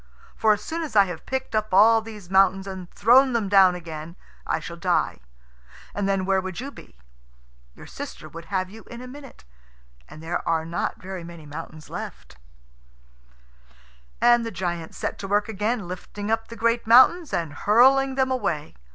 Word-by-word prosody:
For 220 - +3
as 210 0 -5
soon 330 +1 -4
as 310 -8 -6
I 200 -1 +7
have 175 -4 -8
picked 265 -2 -3
up 215 0 -1
all 225 +3 +6
these 215 -4 -10
mountains 195 +1 +3
and 190 -2 -7
thrown 255 +5 +4
them 225 -4 0
down 190 -2 +5
again 165 -1 -8 0.3
I - - 0
shall - - -8
die, - - 0 0.7
and 200 -1 -1
then 195 -1 0
where 190 0 +2
would 185 0 -6
you 275 +3 -6
be? - - -15 0.8
Your - - -12
sister - - -8
would 165 0 -10
have 185 +1 -2
you 220 +4 -13
in 235 - -8
a 255 - -9
minute. 275 - -12 0.7
And 155 - -12
there 170 +2 -2
are 160 -1 +1
not 170 +1 -3
very 185 -1 -7
many 170 -2 -11
mountains 155 +1 -9
left." 60 0 -8 1.8
And 240 0 +5
the 230 - -3
giant 175 -4 -4
set - - -4
to 195 - -5
work 205 +1 +1
again, 215 -1 -2
lifting 205 +3 -6
up 225 0 0
the 230 - -9
great 230 0 0
mountains 260 +8 +6
and 165 -4 -2
hurling 265 - +4
them 260 -1 +1
away. 195 - -2
200 Hz, 180 wpm, -24 LUFS, 175-230 Hz, 1.8 s, I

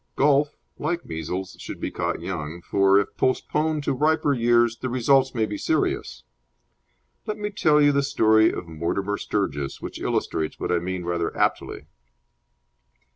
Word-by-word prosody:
Golf, 145 +1 +2 0.2
like 170 +3 -2
measles, 85 +4 -5
should - - -7
be - - -3
caught - - -2
young, 85 -2 -5
for, 100 +2 +4
if 100 - -3
postponed 150 +3 0
to - - 0
riper 150 +1 +2
years, 120 -1 +3
the 130 - -3
results 130 +2 +2
may 110 -2 +2
be 105 -1 -5
serious. 325 - -1 1.0
Let 215 0 -3
me 210 0 -4
tell 155 -6 +3
you 145 -1 +5
the 140 0 +2
story 110 -6 +4
of 90 - -6
Mortimer 95 +5 -2
Sturgis, 70 -9 -2
which - - -7
illustrates 80 -1 -2
what - - -2
I 90 - +2
mean 90 0 -4
rather 85 -1 -2
aptly. - - -1
110 Hz, 155 wpm, -24 LUFS, 90-145 Hz, 1.0 s, you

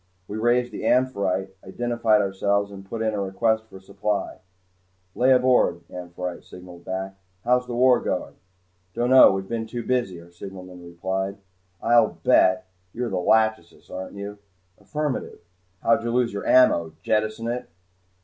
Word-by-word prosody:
We 105 - -5
raised 120 +2 +2
the - - -7
"Amphitrite," 100 -7 0
identified 115 +1 +1
ourselves, 100 +1 0
and 95 -1 -10
put 115 -1 -3
in 110 -1 0
a 105 - -2
request 110 +3 0
for 95 - -12
supply. 100 +1 -3 0.7
"Lay 130 +2 +3
aboard," 125 -9 +3
"Amphitrite" 90 0 -6
signalled 90 -1 -13
back. 95 +1 -5 0.3
"How's 125 +1 +2
the 120 - -4
war 125 0 +5
going?" - - -3 0.6
"Don't 120 +2 0
know. 130 -5 +9
We've 95 0 -3
been 115 0 -3
too 120 +1 -5
busy," 120 -9 -1
our 85 +1 -16
signalman 90 0 -10
replied. 95 +3 -3 0.5
"I'll 120 0 +3
bet 95 0 +4 0.3
you're 120 0 -3
'Lachesis,' 105 0 0
aren't 95 +1 -7
you?" 100 +1 -7 0.4
"Affirmative." 150 -3 -3 0.5
"How'd 115 0 +3
you 120 - -2
lose 120 -1 +1
your 100 - -5
ammo? 85 -11 +4
Jettison 110 +1 0
it?" 120 +1 -4
105 Hz, 150 wpm, -24 LUFS, 95-120 Hz, 0.7 s, know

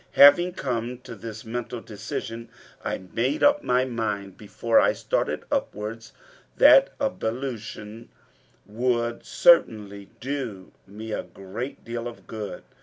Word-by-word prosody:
Having 175 +6 +8
come 125 -6 -3
to 125 -1 -9
this 110 -1 -8
mental 120 +1 -4
decision, 115 +2 -6 0.3
I - - -1 0.2
made 130 +6 0
up 290 0 +5
my 125 +1 +2
mind, 105 -6 -3
before 115 +2 +1
I - - +4
started - - -1
upwards, 110 +2 -3 0.5
that - - +8
ablution 115 - -4 0.6
would 120 +1 -1
certainly 105 - +3
do 125 -8 -4 0.2
me 110 +3 -8
a - - -1
great 105 +8 -7
deal 115 0 -4
of 120 - -10
good. 105 -3 -6
115 Hz, 120 wpm, -25 LUFS, 105-125 Hz, 0.6 s, Having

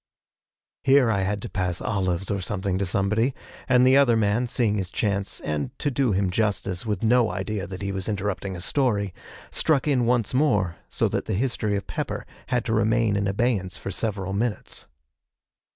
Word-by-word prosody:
Here 135 -3 +5
I 100 - +1
had 100 +1 -1
to - - -4
pass 90 -2 -2
olives 95 -2 -1
or 100 -1 -1
something 95 0 -2
to 100 - 0
somebody, 105 +8 +1 0.3
and 125 0 +5
the 130 +1 +6
other 125 -5 +5
man, 110 +3 +1
seeing 110 -3 +1
his 95 -2 -3
chance, 100 -1 -1
and, 75 - -3
to 145 - -1
do 130 -2 +1
him 95 -1 +1
justice, 100 -2 -1
with 105 -2 -2
no 120 0 +4
idea 100 -1 -3
that 95 +1 -7
he 100 - -1
was 95 +1 -3
interrupting 100 -2 -2
a 85 - -6
story, 100 -4 0 0.4
struck 150 -3 +1
in 125 -5 +2
once 120 -2 +1
more, 105 - +2
so - - +1
that - - -2
the - - -1
history 110 -2 0
of 100 -1 -3
Pepper - - -4 0.2
had 125 -2 0
to 115 - 0
remain 110 0 +2
in 100 0 0
abeyance 100 -3 0
for 95 - -5
several 100 -1 -2
minutes. 110 +2 -3
105 Hz, 185 wpm, -25 LUFS, 95-120 Hz, 0.4 s, the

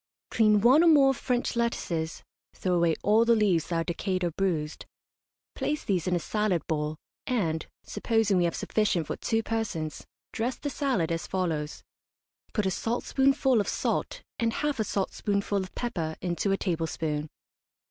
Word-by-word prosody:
Clean 215 -2 +4
one 260 +9 +6
or - - +5
more 280 -4 +6
French 245 -1 -1
lettuces 170 -9 -2 0.3
(throw 185 - -1
away 170 -2 +3
all 215 +3 +5
the 235 0 +4
leaves 195 -7 +2
that 170 - -2
are 165 - +1
decayed 185 +2 -2
or 175 - 0
bruised), 165 -4 -2 0.7
place 300 +1 -2
these 185 -3 0
in 180 - +2
a - - +1
salad 195 -2 0
bowl, 150 -1 -1 0.3
and, 170 - 0 0.2
supposing 225 -4 +1
we 175 - +3
have 170 - -1
sufficient 205 -6 0
for - - -3
two 225 -1 0
persons, 205 -10 -3 0.2
dress 240 +3 -1
the 285 - -4
salad 255 - 0
as 165 0 -2
follows: 160 -5 -2 0.7
Put 210 -4 0
a 190 - +1
saltspoonful 265 +3 +2
of - - -4
salt - - -2 0.2
and 230 -1 +1
half 295 -2 -1
a - - +3
saltspoonful 200 0 -1
of 185 - -8
pepper 165 -10 -3
into 175 +2 -1
a 195 - +2
tablespoon. 160 -4 -2
195 Hz, 165 wpm, -28 LUFS, 165-230 Hz, 0.7 s, one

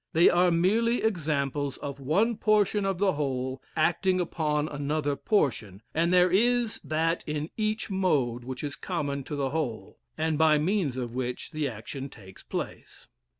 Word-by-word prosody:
They 165 +2 +6
are 175 +1 +4
merely 215 +8 +2
examples 145 -8 -1
of 140 -1 -6
one 195 - +2
portion 210 -1 +2
of 195 -2 0
the 195 0 +2
whole 130 -3 -2
acting 185 +4 +2
upon 155 -4 0
another 145 0 -1
portion, 115 - 0
and 170 +2 +2
there 180 0 +5
is 235 +3 +2
that 165 +2 0
in 150 +1 -3
each 215 -1 -1
mode 140 -11 +1
which 130 +2 -6
is 145 -1 -3
common 140 -1 -3
to 150 - -4
the 135 -2 -1
whole, 120 -11 -3 0.2
and 160 -1 0
by 155 -1 +5
means 160 -4 0
of 120 -2 -4
which 125 0 -4
the 155 -2 -1
action 130 +5 -7
takes 95 -6 -14
place. - - -6
155 Hz, 160 wpm, -28 LUFS, 135-185 Hz, 0.2 s, They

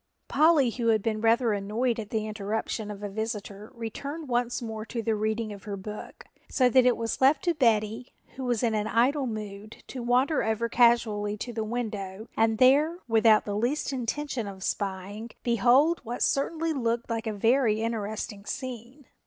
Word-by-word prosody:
Polly, 305 -6 +4
who 235 0 -2
had 220 -3 +3
been 215 -1 -1
rather 230 0 +3
annoyed 220 +4 -1
at 210 -2 -6
the 220 -2 -1
interruption 215 +1 -3
of 205 0 -7
a - - -2
visitor, 210 0 -5
returned 280 +7 -6
once 245 0 0
more 220 -2 -5
to 230 0 -5
the 225 - +1
reading 215 0 -1
of 200 - -12
her 200 -2 -4
book, 210 +2 -8 0.2
so 255 -3 +3
that 255 +1 +5
it 250 - +3
was 230 +2 -3
left 275 +2 +4
to 345 - +2
Betty, 230 -3 +1 0.2
who 265 - -6
was 245 -3 0
in 230 -2 +2
an 215 0 0
idle 255 +5 +2
mood, 215 -1 -7
to 255 - -6
wander 250 +5 +2
over 220 +1 0
casually 225 -4 +2
to 240 +3 -5
the 220 -1 -2
window 215 -3 -4
and 225 0 +2
there, 285 +7 +4
without 225 -1 +4
the 205 - -3
least 255 +6 -1
intention 255 -1 -3
of 190 -1 -8
spying, 200 +3 -3
behold 250 +8 +3
what 240 +1 -3
certainly 320 +3 0
looked 235 -3 -1
like 230 -1 -3
a - - 0
very 225 +1 +2
interesting 215 -2 -4
scene. 255 +3 -7
230 Hz, 180 wpm, -27 LUFS, 215-250 Hz, 0.2 s, that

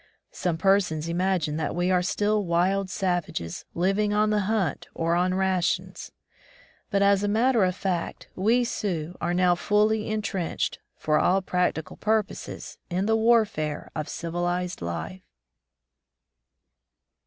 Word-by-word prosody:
Some 175 -3 -2
persons 185 -4 +2
imagine 170 -3 0
that 155 -2 -2
we 175 +1 +1
are 180 -1 +3
still 205 +3 +1
wild 185 +3 +1
savages, 175 - -2
living 195 +4 +1
on 215 0 +3
the 210 - +2
hunt 205 -8 -1
or 165 0 0
on 180 +1 +2
rations; 190 -2 -1 0.8
but 200 0 +2
as 200 -1 +4
a 205 - 0
matter 225 +2 +3
of 185 -1 +1
fact, 185 -4 -3
we 225 +6 +3
Sioux 180 -8 -3
are 175 +1 0
now 180 0 +4
fully 210 +4 +1
entrenched, 205 -5 -2 0.2
for 150 0 +1
all 190 +1 +2
practical 180 -3 -1
purposes, 215 -1 -2
in 185 +2 0
the 220 +1 +3
warfare 220 -10 +1
of 155 -1 -3
civilized 175 - -2
life. 85 +2 -5
185 Hz, 130 wpm, -26 LUFS, 170-205 Hz, 0.8 s, as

